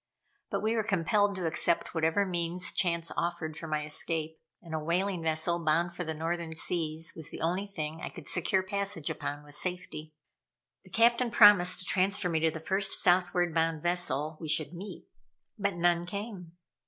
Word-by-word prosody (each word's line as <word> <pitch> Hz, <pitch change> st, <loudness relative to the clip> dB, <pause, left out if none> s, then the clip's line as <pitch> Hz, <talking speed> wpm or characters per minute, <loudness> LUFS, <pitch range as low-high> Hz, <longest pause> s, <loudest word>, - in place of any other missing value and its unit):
But -, -, -2 dB
we 220 Hz, +1 st, +1 dB
were 225 Hz, -, +2 dB
compelled 200 Hz, +1 st, +1 dB
to 185 Hz, -2 st, -4 dB
accept 165 Hz, +1 st, 0 dB
whatever 165 Hz, +4 st, +1 dB
means 175 Hz, 0 st, 0 dB
chance 170 Hz, -2 st, 0 dB
offered 170 Hz, -2 st, -3 dB
for 165 Hz, -, -7 dB
my 155 Hz, -1 st, -2 dB
escape, 160 Hz, +1 st, -2 dB, 0.2 s
and 165 Hz, -2 st, -11 dB
a 160 Hz, -, -1 dB
whaling 175 Hz, +3 st, -1 dB
vessel 165 Hz, +2 st, +1 dB
bound 165 Hz, +2 st, +1 dB
for 180 Hz, -, -4 dB
the 160 Hz, -1 st, -4 dB
Northern 165 Hz, +1 st, -3 dB
Seas 165 Hz, -1 st, +1 dB
was 160 Hz, -1 st, -2 dB
the -, -, -8 dB
only 180 Hz, +5 st, -1 dB
thing 160 Hz, -4 st, -5 dB
I -, -, -5 dB
could 170 Hz, -, -11 dB
secure 185 Hz, +2 st, +1 dB
passage 200 Hz, -4 st, -1 dB
upon 145 Hz, +1 st, -5 dB
with 145 Hz, -1 st, -11 dB
safety. 155 Hz, -2 st, -4 dB, 0.7 s
The -, -, -17 dB
captain 235 Hz, +1 st, +3 dB
promised 205 Hz, -5 st, +7 dB
to -, -, -3 dB
transfer 185 Hz, 0 st, +1 dB
me 160 Hz, -2 st, 0 dB
to 160 Hz, +1 st, +2 dB
the 160 Hz, -, -6 dB
first 190 Hz, +4 st, 0 dB
southward 175 Hz, -1 st, +2 dB
bound 160 Hz, -1 st, 0 dB
vessel 160 Hz, -3 st, +1 dB
we 160 Hz, -, -6 dB
should 155 Hz, +1 st, 0 dB
meet. 190 Hz, +4 st, -8 dB, 0.5 s
But 200 Hz, -2 st, -1 dB
none 175 Hz, 0 st, +1 dB
came. 200 Hz, -3 st, -7 dB
170 Hz, 180 wpm, -29 LUFS, 160-185 Hz, 0.7 s, promised